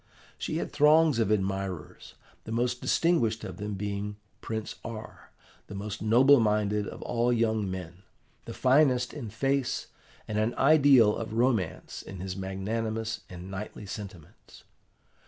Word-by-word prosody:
She -, -, -3 dB
had -, -, -3 dB
throngs 150 Hz, -2 st, +5 dB
of 110 Hz, -3 st, +2 dB
admirers, 95 Hz, -4 st, -3 dB, 0.3 s
the -, -, -7 dB
most 120 Hz, +2 st, 0 dB
distinguished 120 Hz, -11 st, +1 dB
of -, -, -7 dB
them 105 Hz, 0 st, -4 dB
being 100 Hz, +1 st, -4 dB, 0.3 s
Prince 110 Hz, -1 st, -5 dB
R., 110 Hz, -1 st, -8 dB, 0.4 s
the 100 Hz, -, -8 dB
most 105 Hz, +2 st, -5 dB
noble 125 Hz, +6 st, +6 dB
minded 105 Hz, -1 st, +1 dB
of -, -, -8 dB
all 120 Hz, +1 st, +1 dB
young 110 Hz, -4 st, +1 dB
men, 90 Hz, -1 st, -7 dB, 0.4 s
the -, -, -7 dB
finest 130 Hz, -2 st, +3 dB
in 135 Hz, -8 st, -6 dB
face, 135 Hz, +4 st, -1 dB, 0.4 s
and 105 Hz, 0 st, -1 dB
an 110 Hz, +3 st, 0 dB
ideal 135 Hz, -7 st, +6 dB
of 110 Hz, -1 st, -5 dB
romance 115 Hz, -7 st, 0 dB
in 95 Hz, -, -9 dB
his 95 Hz, 0 st, -4 dB
magnanimous 110 Hz, +4 st, -3 dB
and 90 Hz, +1 st, -9 dB
knightly 105 Hz, +2 st, -7 dB
sentiments. 95 Hz, -6 st, -10 dB
110 Hz, 140 wpm, -28 LUFS, 100-120 Hz, 0.4 s, noble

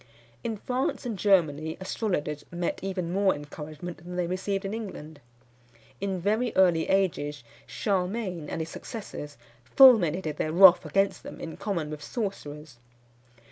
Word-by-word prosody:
_" -, -, -21 dB, 0.4 s
In 225 Hz, -2 st, -3 dB
France 255 Hz, +4 st, -2 dB
and 235 Hz, -3 st, -2 dB
Germany 160 Hz, -6 st, +2 dB
astrologers 180 Hz, -7 st, -2 dB
met 175 Hz, 0 st, -3 dB
even 185 Hz, -3 st, -3 dB
more 195 Hz, 0 st, +3 dB
encouragement 150 Hz, +3 st, -8 dB
than 175 Hz, +1 st, -9 dB
they 180 Hz, -1 st, 0 dB
received 190 Hz, +3 st, -2 dB
in 195 Hz, -, -3 dB
England. 160 Hz, -9 st, -7 dB, 0.8 s
In 195 Hz, -2 st, -2 dB
very 215 Hz, +6 st, +1 dB
early 175 Hz, -4 st, +4 dB
ages 155 Hz, -8 st, 0 dB, 0.2 s
Charlemagne 185 Hz, -4 st, -2 dB
and 165 Hz, -, -3 dB
his 160 Hz, -, -4 dB
successors 155 Hz, -8 st, -8 dB, 0.3 s
fulminated 175 Hz, -, +5 dB
their 155 Hz, -, -1 dB
wrath 180 Hz, 0 st, +8 dB
against 195 Hz, 0 st, +1 dB
them -, -, -9 dB
in 165 Hz, -, -6 dB
common 170 Hz, -7 st, -3 dB
with 150 Hz, -1 st, -6 dB
sorcerers. 150 Hz, -, -5 dB
180 Hz, 140 wpm, -27 LUFS, 155-200 Hz, 0.8 s, wrath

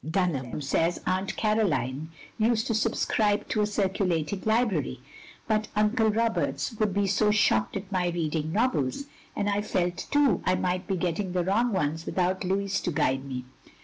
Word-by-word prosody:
Dtinham 155 Hz, -5 st, -1 dB
says 165 Hz, +5 st, +1 dB
Atant 185 Hz, +1 st, -1 dB
Caroline 160 Hz, -, 0 dB, 0.3 s
used 220 Hz, 0 st, +2 dB
to 230 Hz, -, 0 dB
subscribe 215 Hz, -1 st, +1 dB
to 215 Hz, -, +1 dB
a 210 Hz, -, +2 dB
circulating 190 Hz, -3 st, 0 dB
library, 220 Hz, -, +1 dB, 0.5 s
but 215 Hz, -1 st, +1 dB
Uncle 215 Hz, +2 st, +3 dB
Roberts 230 Hz, +2 st, 0 dB
would 215 Hz, -2 st, +2 dB
be 200 Hz, +1 st, +1 dB
so 205 Hz, +2 st, +2 dB
shocked 210 Hz, -1 st, +2 dB
at 195 Hz, 0 st, -8 dB
my 180 Hz, -2 st, +1 dB
reading 160 Hz, -2 st, -1 dB
novels; 215 Hz, -, 0 dB, 0.3 s
and 205 Hz, -, -1 dB
I 205 Hz, 0 st, +1 dB
felt, 180 Hz, -4 st, -2 dB
too, 290 Hz, -2 st, +3 dB
I 185 Hz, -, +2 dB
might 180 Hz, 0 st, -1 dB
be 195 Hz, -2 st, 0 dB
getting 180 Hz, +1 st, -2 dB
the 180 Hz, -1 st, +1 dB
wrong 220 Hz, +7 st, +1 dB
ones 160 Hz, -3 st, -1 dB
without 185 Hz, 0 st, 0 dB
Louis 195 Hz, +1 st, 0 dB
to 175 Hz, -, -2 dB
guide 135 Hz, -2 st, 0 dB
me. 125 Hz, -2 st, -5 dB
190 Hz, 165 wpm, -27 LUFS, 170-215 Hz, 0.5 s, Uncle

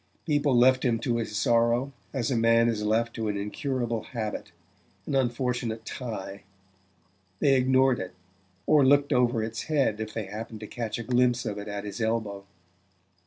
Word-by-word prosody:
People 145 Hz, -4 st, +2 dB
left 130 Hz, +1 st, +5 dB
him 120 Hz, -3 st, +2 dB
to 120 Hz, +1 st, -1 dB
his 110 Hz, -2 st, -3 dB
sorrow 120 Hz, +4 st, +2 dB, 0.2 s
as 130 Hz, -2 st, -1 dB
a -, -, +1 dB
man 115 Hz, 0 st, +4 dB
is 110 Hz, -2 st, -1 dB
left 115 Hz, +2 st, +1 dB
to 110 Hz, -2 st, -3 dB
an 105 Hz, -1 st, -1 dB
incurable 120 Hz, +2 st, -2 dB
habit, 110 Hz, -3 st, -5 dB, 0.5 s
an -, -, -4 dB
unfortunate 120 Hz, -3 st, -1 dB
tie: 105 Hz, -6 st, -6 dB, 1.0 s
they 140 Hz, -, +4 dB
ignored 130 Hz, 0 st, +3 dB
it, 90 Hz, -1 st, -6 dB, 0.5 s
or 150 Hz, -2 st, +5 dB
looked 145 Hz, +2 st, +4 dB
over 120 Hz, -3 st, +2 dB
its 115 Hz, 0 st, -4 dB
head 140 Hz, -9 st, +1 dB
if 110 Hz, 0 st, -4 dB
they 110 Hz, -1 st, -4 dB
happened 110 Hz, +2 st, -7 dB
to -, -, -5 dB
catch 115 Hz, 0 st, -4 dB
a 120 Hz, -, -5 dB
glimpse 125 Hz, 0 st, +2 dB
of 105 Hz, -2 st, -3 dB
it 100 Hz, -, -7 dB
at 100 Hz, -1 st, -4 dB
his 105 Hz, +3 st, -6 dB
elbow. 110 Hz, -3 st, -2 dB
115 Hz, 170 wpm, -27 LUFS, 110-130 Hz, 1.0 s, left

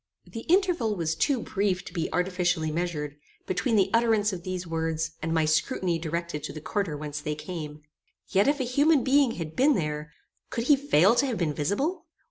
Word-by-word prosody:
The 225 Hz, -1 st, -9 dB
interval 350 Hz, -, +2 dB
was 165 Hz, -3 st, -1 dB
too 255 Hz, -, +1 dB
brief 195 Hz, -2 st, -1 dB
to -, -, -9 dB
be 170 Hz, -4 st, -2 dB
artificially 180 Hz, -3 st, 0 dB
measured, 150 Hz, -3 st, -3 dB, 0.3 s
between 225 Hz, +6 st, 0 dB
the 195 Hz, -2 st, +3 dB
utterance 225 Hz, -3 st, +3 dB
of 180 Hz, -, -5 dB
these 185 Hz, 0 st, -4 dB
words, 160 Hz, -1 st, -2 dB
and 165 Hz, -, -2 dB
my 160 Hz, -1 st, +2 dB
scrutiny 170 Hz, -, +1 dB
directed 170 Hz, -1 st, -3 dB
to -, -, -6 dB
the 155 Hz, -, -6 dB
quarter 170 Hz, -1 st, -2 dB
whence 145 Hz, 0 st, -5 dB
they 150 Hz, 0 st, -3 dB
came. 150 Hz, -1 st, -7 dB, 0.4 s
Yet 195 Hz, +5 st, +2 dB
if 290 Hz, 0 st, +2 dB
a -, -, +1 dB
human 280 Hz, +3 st, +3 dB
being 270 Hz, -2 st, +3 dB
had 160 Hz, -2 st, -6 dB
been 280 Hz, +2 st, +4 dB
there, 150 Hz, -2 st, -3 dB, 0.4 s
could 230 Hz, -, -2 dB
he 290 Hz, +4 st, +5 dB
fail 230 Hz, -, +4 dB
to 250 Hz, +3 st, +2 dB
have 240 Hz, -5 st, -2 dB
been 160 Hz, -4 st, 0 dB
visible? 205 Hz, -, -1 dB
180 Hz, 195 wpm, -27 LUFS, 160-230 Hz, 0.4 s, he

